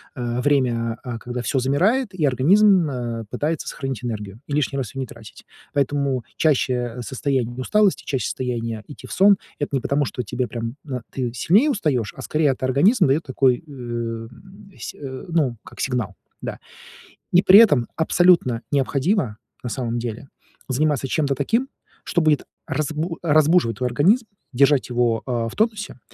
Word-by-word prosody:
э, 120 -1 -2
время, 120 -5 +1
э, 120 -3 -5
когда 120 +1 -5
всё 120 +4 -1
замирает, 185 - +1
и 175 -4 -3
организм, 180 - +4
э, 120 -3 -4
пытается 150 +5 -2
сохранить 135 -4 -5
энергию 105 -3 -5
и 145 - -5
лишний 145 -1 0
раз 130 -2 -4
её 135 - -4
не 130 - -4
тратить. - - -13 0.3
Поэтому 140 -3 0
чаще 125 -5 +1
состояние 125 0 -2
усталости, 200 +10 +2
чаще 130 -6 -1
состояние 115 -3 -3
идти 145 - -11
в - - -12
сон. 200 0 +5 0.2
Это 145 - -2
не 135 - +2
потому, 145 0 +1
что 125 - -4
тебе 125 +3 -2
прям, 115 +1 -5
э, 130 -3 -4
ты 125 -3 -3
сильнее 200 - +3
устаёшь, 140 - -1
а - - -8
скорее 150 +1 +1
это 130 - -3
организм 145 - +4
даёт 140 +5 +2
такой, 130 +1 +2
э, 150 - -15
м 120 +9 -7
сь - - -6
э, 130 0 -7
ну, 145 -8 +1
как - - -14
сигнал, 120 -6 -2 0.3
да. - - -5 0.7
И 180 - +6
при 195 +3 +9
этом 145 - +5
абсолютно 160 -8 +3
необходимо, 140 - 0 0.3
на 125 - -3
самом 120 -1 -2
деле, 120 +3 -5 0.4
заниматься 140 0 0
чем-то 140 0 0
таким, 230 - 0 0.3
что 175 - 0
будет 155 -2 +2 0.2
разбу 155 +3 -2
разбуживать 155 - +3
твой 125 -1 -1
организм, 190 - +3 0.3
держать 140 +1 +3
его, 120 -2 +1
э, 120 -3 -1
в - - -12
тонусе, 215 - -1
135 Hz, 170 wpm, -22 LUFS, 120-155 Hz, 0.7 s, при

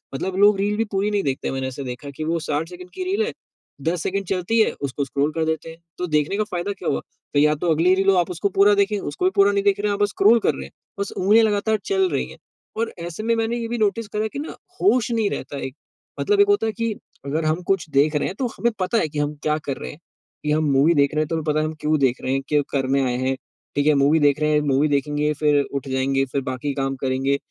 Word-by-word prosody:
मतलब 185 +6 -3
लोग 205 0 +6
रील 205 +1 0
भी 225 - +1
पूरी 200 +2 0
नहीं 205 -1 0
देखते, 135 -2 -2
मैंने 130 0 -2
ऐसा 135 +2 -6
देखा 125 +2 -7
है - - -6
कि 155 - -3
वो 165 +1 0
60 155 +1 -2
सेकंड 180 0 -10
की 370 - -4
रील 395 +4 0
है, 465 - -3 0.5
10 165 +3 -1
सेकंड 195 +1 -2
चलती 195 +4 0
है, 220 - +4
उसको 140 0 -2
स्क्रॉल 140 +3 0
कर 160 -1 0
देते 160 0 -2
हैं। 165 - -11 0.2
तो 180 - -2
देखने 150 +5 +1
का 215 - +2
फ़ायदा 175 +3 -2
क्या 185 - -4
हुआ? - - 0 0.3
तो 145 - +3
या 150 +1 +4
तो 165 +2 0
अगली 170 +4 +4
रील 195 +1 +2
हो, 195 - +5
आप 180 0 +1
उसको 190 +4 -1
पूरा 205 +1 +7
देखें, 200 +1 +2
उसको 365 - -3
भी 375 - +3
पूरा 200 +1 +5
नहीं 200 0 0
देख 200 -1 +2
रहे 210 - 0
हैं, - - +1
आप - - -5
बस 205 - +2
स्क्रॉल 220 +5 +4
कर - - +4
रहे 65 0 -6
हैं। 70 - -13 0.3
बस 200 - -2
उँगलियाँ 215 +4 +5
लगातार 215 +1 +1
चल 385 -2 +2
रही - - -1
हैं - - -12 0.4
और 230 0 -1
ऐसे 175 +5 -6
में 230 0 +2
मैंने 225 +1 -1
ये 230 -1 -3
भी 240 +1 -3
नोटिस 215 +1 0
करा 215 0 -2
है 220 - -1
कि 280 - -6
ना, 305 - -6 0.3
होश 250 - +3
नहीं 220 -3 +1
रहता 140 - -5
एक। 130 - -7 0.4
मतलब 410 0 +2
एक 405 - +5
होता 410 - +2
है - - 0
कि 230 +1 -1 0.3
अगर 155 +3 -1
हम 160 +3 0
कुछ 195 -5 0
देख 150 +2 +2
रहे 150 - +1
हैं, 190 - -5
तो 255 - +1
हमें 235 0 +1
पता 185 +5 +1
है 160 - +2
कि 150 0 -4
हम 145 +1 -1
क्या 150 0 +1
कर 140 - -3
रहे - - -6
हैं 150 - -14 0.4
कि 150 - 0
हम 155 +1 +2
मूवी 140 +5 +4
देख 140 0 +2
रहे 155 - +1
हैं, 155 - -1
तो 165 - -2
हमें 160 - -2
पता 155 0 +1
है, 155 - +1
हम 155 - -3
क्यों 155 0 +1
देख 130 -2 +1
रहे 130 - -1
हैं, 135 - 0
क्या 150 -1 +3
करने 135 0 +1
आए 125 -1 0
हैं। 130 +1 0 0.4
ठीक 145 +1 +1
है, 150 - +6
मूवी 150 +3 +4
देख 145 0 +3
रहे 150 0 +1
हैं, 150 - +4
मूवी 145 +1 +2
देखेंगे, 145 +1 0
फिर 150 -1 +2
उठ 140 0 -5
जाएँगे, 135 +1 +1
फिर 135 +1 -2
बाकी 130 +2 -3
काम 135 0 -2
करेंगे। 135 +1 +1
160 Hz, 290 wpm, -22 LUFS, 145-205 Hz, 0.5 s, पूरा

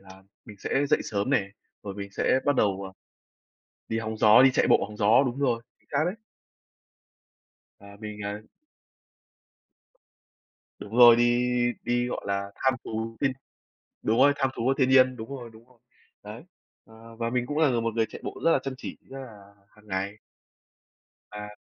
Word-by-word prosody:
là 95 0 -16 0.2
mình 105 - -12
sẽ 140 +8 0
dậy - - +2
sớm 100 +4 -2
nè, 100 -8 +1 0.3
rồi 100 -2 -6
mình 100 0 -7
sẽ 130 - +1
bắt 145 - +2
đầu, 100 -1 +1
à, 95 - -7 1.0
đi 110 - -1
hóng 110 -1 -4
gió, 110 +3 +7
đi 135 - +7
chạy - - +2
bộ - - +4
hóng 105 0 -11
gió. 110 +6 +4
Đúng 125 +1 -3
rồi, 125 -5 0 0.2
chính - - -36
xác - - +2
đấy. 180 +3 -1 1.7
À, 100 0 -14
mình, 105 -1 -7
ờ 105 +1 -5 2.4
Đúng 110 +3 -7
rồi, 120 -1 +9
đi 120 +1 +2 0.4
đi, 120 0 0
gọi - - -4
là, 100 0 -2
tham 130 - +1
thú 115 +1 -5
thiên, 135 -2 +2 0.7
đúng 110 +2 +1
rồi, 145 +2 +6
tham 135 -1 0
thú - - -4
của 135 +2 +2
thiên 130 -2 +3
nhiên. 130 -1 +5
Đúng 110 0 -8
rồi, 125 -4 -7
đúng 115 +2 -17
rồi. 125 -2 -25 0.4
Đấy. - - -9 0.4
Ờ, 115 +1 -15
và 115 0 -2
mình 125 0 -1
cũng 145 +3 -3
là 160 -2 +4
là 120 -2 0
một 115 -1 -2
người 115 -1 +1
chạy - - -10
bộ - - -6
rất 165 - +5
là - - +3
chăm 135 -1 -4
chỉ, - - -7
rất 135 - -8
là 105 -6 -13
hàng 105 +1 -23
ngày. 100 +1 -3 1.1
À. 105 0 -8
115 Hz, 190 wpm, -26 LUFS, 105-130 Hz, 2.4 s, rồi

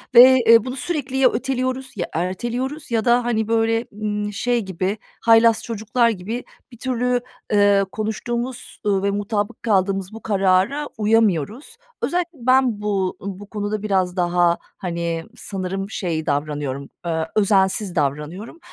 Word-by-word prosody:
ve, 260 +2 +10
eee, 230 -1 +8
bunu 255 - -4
sürekli 275 -3 -3
ya 265 -1 +5
öteliyoruz 260 +1 -2
ya 175 -4 -2
erteliyoruz 240 - -3
ya 225 -2 +1
da, 240 0 +4
hani, 220 -2 0
böyle, 225 +1 +1
ımm, 210 0 -3
şey 240 +3 0
gibi 190 +1 -2 0.2
haylaz 225 0 +5
çocuklar 230 +2 +1
gibi 220 +4 -4 0.3
bir 240 - -13
türlü, 250 0 0 0.3
eee, 205 -1 +4
konuştuğumuz, 235 +3 -4
ııı, 195 -1 +1
ve 200 - +2
mutabık 205 +2 -2
kaldığımız 195 -2 +1
bu 225 - -9
karara 195 +8 +2
uyamıyoruz. 220 - +1 0.2
Özellikle 345 -3 -2
ben 255 -3 +3
bu 195 -3 -1
bu 200 +1 -7
konuda 210 0 -3
biraz 190 -3 +1
daha, 175 -1 +2 0.2
hani, 170 -2 -3
sanırım 195 0 -4
şey 165 -7 -3
davranıyorum, 145 -1 -2 0.2
eee, 160 -1 -1
özensiz 195 -2 +2
davranıyorum 150 - -3
210 Hz, 140 wpm, -21 LUFS, 185-240 Hz, 0.3 s, ve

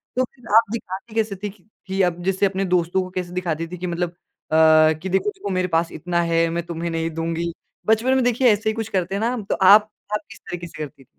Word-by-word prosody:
तो 255 - +2
फिर 245 -2 -11
आप 225 -2 +5
दिखाती 215 0 -6
कैसे 215 -3 0
थी 205 - -1
कि 195 -2 -17 0.2
कि 190 +1 0
अब 175 +1 -11
जैसे 190 +1 +1
अपने 195 0 0
दोस्तों 180 +1 +1
को 185 - -8
कैसे 180 -1 -5
दिखाती 165 -3 -2
थी 180 +1 -8
कि 180 +1 -4
मतलब 175 0 -1
अ, - - -33 0.8
कि 170 +5 -6
देखो, 190 - +1
देखो 380 - -6
मेरे 185 -1 0
पास 165 0 -1
इतना 170 +2 -1
है, 165 0 +2
मैं 170 +1 -2
तुम्हे 170 0 -4
नहीं 165 0 -1
दूँगी। 165 +1 -2 0.4
बचपन 225 +4 +3
में 260 - +2
देखिए 245 +1 +3
ऐसे 220 +2 -1
ही - - 0
कुछ 225 -1 -3
करते 185 0 -1
हैं - - -1
ना 235 +2 +1
हम, 225 -4 -4
तो - - -1
आप 205 +3 +6 0.2
आप 210 - 0
किस 220 - -12
तरीके 175 -1 -7
से - - -13
करती 140 -2 -10
थी? - - -30
185 Hz, 255 wpm, -22 LUFS, 170-215 Hz, 0.8 s, आप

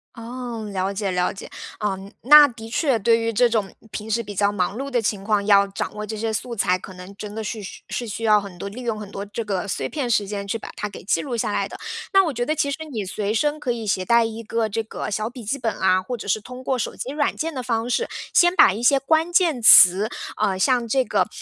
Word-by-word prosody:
哦， 235 -1 -6
了 190 0 -1
解 200 -1 -2
了 180 +1 0
解。 195 - -10 0.3
嗯， 195 -1 -3
那 295 +4 +9
的 225 -3 -10
确 265 +1 +1
对 230 +2 +3
于 230 0 -1
这 245 +3 +4
种， 215 -4 -1 0.2
平 215 +1 -6
时 235 +2 0
比 205 -1 -8
较 200 +1 +2
忙 195 -1 -1
碌 275 +2 -4
的 250 -3 +1
情 205 -2 -2
况， 205 -1 +1
要 200 -1 +5
掌 195 - -5
握 210 - -6
这 215 0 -6
些 225 0 -2
素 235 +2 -3
材， 185 -2 +1
可 190 - -11
能 180 +2 -11
真 210 +1 -8
的 220 - -4
是 215 0 -5
需 195 - -9
是 240 - -3
需 225 +2 -5
要 210 -1 +4
很 195 -3 -10
多， 200 - -6
利 230 +6 -8
用 225 -3 -3
很 205 -1 -9
多 200 - -5
这 210 +3 -5
个 195 -1 -2
碎 - - -2
片 280 -6 -3
时 210 -3 +1
间 200 0 -5
去 230 - -1
把 - - -9
它 210 - -4
给 200 - -11
记 195 - +1
录 250 -5 -4
下 220 -2 -1
来 - - -1
的。 - - -9 0.4
那 390 0 +6
我 315 - -2
觉 240 0 -2
得 310 +3 0
其 285 -2 0
实 280 - -3
你 215 -6 -3
随 205 +2 -3
身 295 +7 0
可 255 -5 -2
以 230 -2 -4
携 190 -2 0
带 235 +3 +4
一 225 0 -5
个 225 0 -1
这 225 +2 -2
个 215 -1 -6
小 215 +2 -2
笔 245 -2 -10
记 270 +7 -2
本 225 -3 -1
啊， 185 0 +3
或 240 +6 -5
者 - - -9
是 210 +2 0
通 250 +4 -10
过 260 0 0
手 - - -3
机 265 - -5
软 290 -1 0
件 325 +1 -2
的 260 - -4
方 230 -1 -1
式， 470 - 0 0.3
先 350 +1 +5
把 190 - +6
一 220 - -5
些 275 +3 +4
关 320 +5 +1
键 335 -8 +2
词， 195 0 +8 0.3
呃， 190 -1 0
像 240 +3 +2
这 260 +2 +1
个， - - +1
220 Hz, 290 characters per minute, -22 LUFS, 200-250 Hz, 0.4 s, 那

